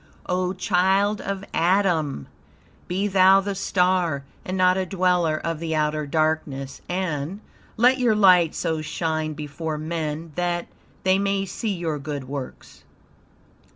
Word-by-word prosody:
O 180 0 -1
child 195 +2 +2
of 195 0 -4
Adam! 170 - +1 0.6
Be 190 +3 -1
thou 190 0 +6
the 200 +1 -2
star, 180 -6 +1 0.2
and 185 +1 -4
not 185 0 +4
a 190 - 0
dweller 180 -4 +1
of 165 0 -3
the 160 -1 -2
outer 150 -1 0
darkness, 150 -3 -1
and 180 -1 -2 0.4
"Let 250 +3 +4
your 240 -4 +3
light 180 -5 +5
so 160 -2 -1
shine 155 0 -2
before 150 +1 -5
men, 160 0 -4
that, 175 +1 -1 0.4
they 190 +1 +3
may 195 0 0
see 200 +2 -3
your 165 -4 -3
good 140 -1 -5
works." 135 0 -8
175 Hz, 135 wpm, -24 LUFS, 155-190 Hz, 0.6 s, thou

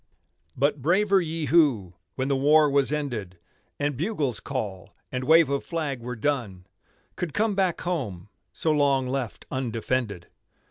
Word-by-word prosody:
But 140 +1 +1
braver 195 +6 +3
ye 165 -1 -3
who, 140 - +3 0.2
when 130 0 -1
the 140 - +1
war 150 +3 +5
was 140 0 +3
ended, 120 -12 -3 0.4
And 145 -1 0
bugle's 150 - -1
call 105 -10 -5 0.2
and 125 0 -3
wave 160 +2 +6
of 140 - -1
flag 155 -6 -3
were 125 +1 -5
done, 110 -8 -2 0.5
Could 175 -4 -4
come 215 0 +2
back 190 -3 0
home, 110 - -3 0.2
so 155 - -1
long 140 -3 +2
left 125 - -4
undefended. 115 -6 -2
140 Hz, 145 wpm, -26 LUFS, 120-155 Hz, 0.5 s, wave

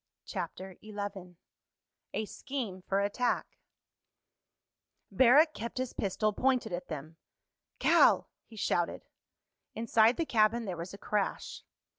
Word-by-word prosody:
CHAPTER 190 -1 -6
XI 205 -4 -6 0.8
A 220 - -1
SCHEME 230 -6 -5
FOR 195 +2 0
ATTACK 205 +5 0 1.7
Barrack 290 +6 +6
kept 235 +3 -6
his 255 -1 -2
pistol 210 +2 0
pointed 255 -4 +1
at 175 - -4
them. 155 +1 -7 0.6
"Cal!" - - +5 0.2
he 225 - -16
shouted. 175 -4 -1 0.7
Inside 225 +1 +3
the 330 - 0
cabin 225 -2 +2
there 185 -3 -3
was 170 +3 -7
a - - -11
crash. 205 -1 -2
210 Hz, 115 wpm, -31 LUFS, 190-235 Hz, 1.7 s, Barrack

